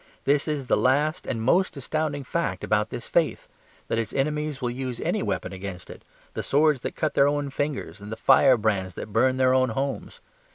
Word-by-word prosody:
This 140 +1 +2
is 150 -3 -2
the - - +2
last 145 +5 +1
and 115 -2 -2
most 175 +6 +2
astounding 145 +1 -2
fact 125 - -2
about 105 0 +1
this 120 - -6
faith; 165 -2 0 0.4
that 115 - 0
its 110 -2 -3
enemies 150 +1 -1
will 125 -2 -2
use 130 -1 -5
any - - -1
weapon - - -3
against 95 -1 -7
it, - - -12 0.3
the - - -3
swords 150 -2 +2
that - - -5
cut 155 - -1
their 140 - +4
own 145 -1 -1
fingers, 135 - -3
and 105 +1 -9
the - - -3
firebrands 105 -8 +3
that 105 - -7
burn 130 +3 +3
their 130 0 +4
own 130 -1 +3
homes. 135 +4 -4
130 Hz, 200 wpm, -25 LUFS, 115-145 Hz, 0.4 s, their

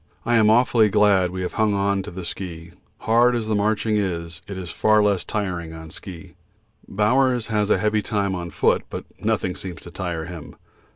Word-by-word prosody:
I 120 - +1
am 110 -1 +5
awfully 115 -1 +4
glad 100 -3 +4
we 95 +1 -4
have 90 - -4
hung 105 -2 +2
on 100 0 +1
to 95 - -7
the 90 -1 -7
ski; 85 -2 -6 0.3
hard 120 +2 +4
as 115 -2 -2
the 110 - 0
marching 105 +1 +1
is, 85 -3 -3
it 100 - -6
is 90 -2 -6
far 110 -1 +3
less 100 -4 +1
tiring 90 -6 -3
on 80 -1 -10
ski. 90 -1 -9 0.5
Bowers 120 +4 +2
has 105 -1 +1
a - - +4
heavy 105 0 +1
time 100 -2 -1
on 85 -1 -4
foot, 75 - +2
but - - -6 0.2
nothing 90 -1 0
seems 90 -3 -8
to 85 - -10
tire 85 -3 -4
him. 85 -2 -9
100 Hz, 195 wpm, -23 LUFS, 90-110 Hz, 0.5 s, am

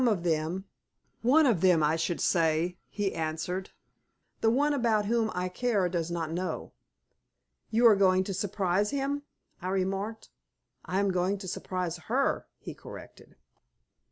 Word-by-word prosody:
"Some 255 - +4
of 205 -7 +1
them. 165 +3 -1 0.6
One 290 +7 +5
of 225 - +3
them 180 -4 +5
I 150 +2 +3
should 165 +1 -1
say," 165 +1 +1
he 205 -2 -2
answered. 165 +4 -3 0.7
"The 225 - +3
one 290 +5 +2
about 230 -6 +2
whom 225 +1 +1
I 180 0 -1
care 205 0 0
does 170 -2 -2
not 165 -2 -3
know." 180 +2 -4 1.0
"You 230 +2 +3
are 225 -3 +8
going 190 -1 +4
to 195 - -4
surprise 195 +1 0
him?" 280 +1 -1 0.4
I 180 - -4
remarked. 195 +3 -2 0.5
"I 185 - -1
am 200 -1 +2
going 185 +2 0
to 190 -1 -8
surprise 180 -1 -3
her," 270 +4 +1
he - - -8
corrected. - - -12
190 Hz, 155 wpm, -29 LUFS, 175-220 Hz, 1.0 s, are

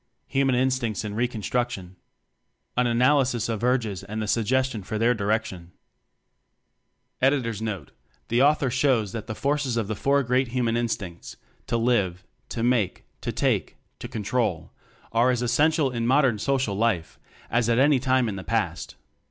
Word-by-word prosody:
Human 135 -1 +2
Instincts 125 -4 0
in 105 - -4
Reconstruction. 115 -4 -2 0.8
An 125 0 +2
Analysis 125 -1 +2
of 115 -1 -3
Urges 115 -7 0
and 110 +2 -4
a - - -4
Suggestion 125 +1 +1
For 110 +3 -4
Their 115 +3 +3
Direction. 100 -5 -2 1.5
By 130 - +4
William 140 -2 0
Henry 115 -1 -3
Smyth - - -8
Note 95 -10 -5 0.4
The 120 +2 +2
author 140 -2 +3
shows 125 -6 +2
that 110 0 -6
the 110 - -4
forces 140 -3 0
of 110 -3 -1
the 110 - -2
four 140 +6 +2
great 125 +2 +1
human 120 -1 0
instincts 110 -7 -4 0.3
to 115 - 0
live, 100 -7 +1 0.3
to 115 - -3
make, 120 -6 +1 0.2
to - - -2
take, - - 0 0.2
to - - -6
control 105 -6 -2 0.4
are 115 +2 +3
as 125 -1 +1
essential 145 +4 +2
in 115 -1 -2
mod 140 +3 +4
ern 115 -5 +1
social 135 -3 0
life 100 -6 -1 0.3
as 120 0 +2
at 115 - +3
any 140 +1 +4
time 130 -1 +2
in 100 -3 -3
the 95 - -6
past. - - -2
120 Hz, 170 wpm, -25 LUFS, 110-130 Hz, 1.5 s, By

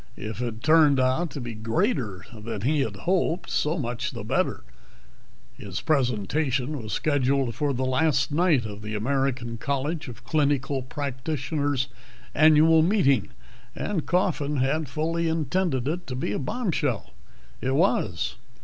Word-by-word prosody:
If 110 +3 -5
it 115 -2 -4
turned 155 -3 +5
out 130 +7 +2
to 145 - -6
be 120 -2 -5
greater 115 - -1
than 110 -1 -5
he 145 +7 +1
had 110 -7 -2
hoped, 175 - 0
so 155 +4 +1
much 120 -5 -2
the - - -7
better. - - 0 0.9
His 95 -3 -6
presentation 135 +1 0
was 110 -1 -7
scheduled 135 -4 +1
for 145 +1 0
the 130 0 -1
last 135 0 +2
night 155 -6 +3
of 105 -1 -7
the 105 0 -5
American 125 0 -1
College 145 +4 -2
of 120 0 -10
Clinical 140 -1 +1
Practitioners' 140 +1 -2 0.5
annual 155 +1 +6
meeting, 155 - +3 0.5
and 190 -7 -2
Coffin 155 -5 +1
had 135 +3 0
fully 165 +3 -1
intended 160 -3 0
it 175 +4 -3
to 125 - -4
be 125 - -2
a - - -1
bombshell. 145 - -1 0.5
It 130 +1 0
was. 110 - +1
140 Hz, 140 wpm, -26 LUFS, 120-155 Hz, 0.9 s, annual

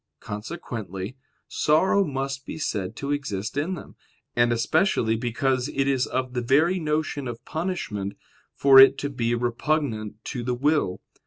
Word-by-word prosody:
Consequently, 105 - -6 0.3
sorrow 185 +6 +3
must 135 -3 -3
be - - -7
said 100 -11 -3
to 140 0 -4
exist 115 -7 -3
in 160 +6 -1
them: - - -11 0.4
and 120 0 +3
especially 120 - +2
because 125 +3 0
it 135 -1 0
is 135 -2 +1
of 130 0 -2
the 125 - -1
very 155 +9 +3
notion 150 -3 -1
of 120 -1 -7
punishment 155 - -3 0.4
for 135 -1 +7
it 135 +1 +8
to 145 0 -3
be 120 -3 0
repugnant 120 -2 -1
to 125 - -4
the 125 +1 -1
will. 140 -8 +1
130 Hz, 150 wpm, -25 LUFS, 115-150 Hz, 0.4 s, it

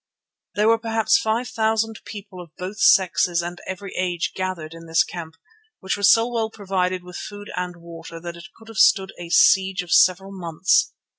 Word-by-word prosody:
There 210 +1 +2
were 230 0 +4
perhaps 225 -1 +2
five 225 +3 -1
thousand 220 0 0
people 200 -3 -9
of 170 -3 -15
both 190 +4 -6
sexes 185 - +3
and 175 +1 -7
every 190 +1 -6
age 175 -2 -1
gathered 185 -4 -4
in 165 0 -12
this 165 0 +3
camp, 165 -2 -8 0.4
which 190 - -2
was 200 -1 +5
so 225 +1 +4
well 230 -2 -2
provided 185 -4 -2
with 180 0 -9
food 205 0 -8
and 180 -1 -4
water 170 -1 -10
that 170 0 -7
it 170 +3 -11
could 225 - -17
have 225 -2 -10
stood 195 -7 +4
a 175 -1 -8
siege 190 +1 +4
of 175 - -11
several 190 +2 +4
months. 180 -1 +1
190 Hz, 190 wpm, -22 LUFS, 175-215 Hz, 0.4 s, was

